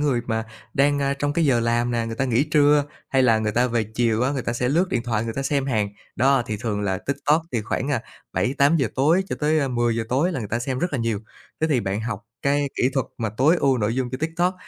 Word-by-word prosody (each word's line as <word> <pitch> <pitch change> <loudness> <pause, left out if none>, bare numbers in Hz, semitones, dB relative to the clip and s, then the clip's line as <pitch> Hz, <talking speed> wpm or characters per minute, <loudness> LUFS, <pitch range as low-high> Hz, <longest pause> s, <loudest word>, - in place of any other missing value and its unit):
người 140 -5 +1
mà 110 -1 -1 0.3
đang, 145 +1 +3
a, 140 0 0
trong 145 +1 -1
cái 165 +2 +1
giờ 125 -5 +3
làm 120 +1 +1
nè, 115 -1 -1
người 115 - -4
ta 135 - 0
nghỉ 125 +2 +2
trưa, 150 -1 +4 0.2
hay 135 -1 +3
là 115 -3 +4
người 110 -1 -1
ta 125 +3 +3
về 115 -2 0
chiều 115 +1 0
á, 130 - +2
người 135 -3 -2
ta 115 - -2
sẽ 125 +1 -1
lướt 175 +6 +2
điện 120 -2 -1
thoại 115 -2 -1
người 115 - -4
ta 140 - -2
xem 140 -1 0
hàng. 110 -6 0 0.3
Đó, 135 0 +3
thì 110 - -3
thường 105 -2 -2
là 95 -2 -1
TikTok 145 +6 0
thì 115 -3 0
khoảng, 130 +5 -2
a, 145 - 0 0.3
7:00-8:00 140 0 +2
tối 160 +8 +3
cho - - -3
tới, 155 +1 +2
a, 140 -2 0
10:00 120 -2 0
tối 150 +9 +1
là 135 - -2
người 105 -4 -5
ta 115 - -1
xem 130 +1 -3
rất 175 0 -1
là 135 - -1
nhiều. 115 -3 -1 0.4
Thế 160 - +3
thì 130 -4 +3
bạn 100 +1 -2
học 110 -1 -4 0.2
cái 140 0 +1
kỹ 125 - +3
thuật 135 - 0
mà 110 -2 -1
tối 155 +7 +4
ưu 135 -5 +2
nội 105 +1 0
dung 130 -1 -1
cho 130 - -4
TikTok, 175 +3 0
130 Hz, 270 wpm, -23 LUFS, 115-145 Hz, 0.4 s, trưa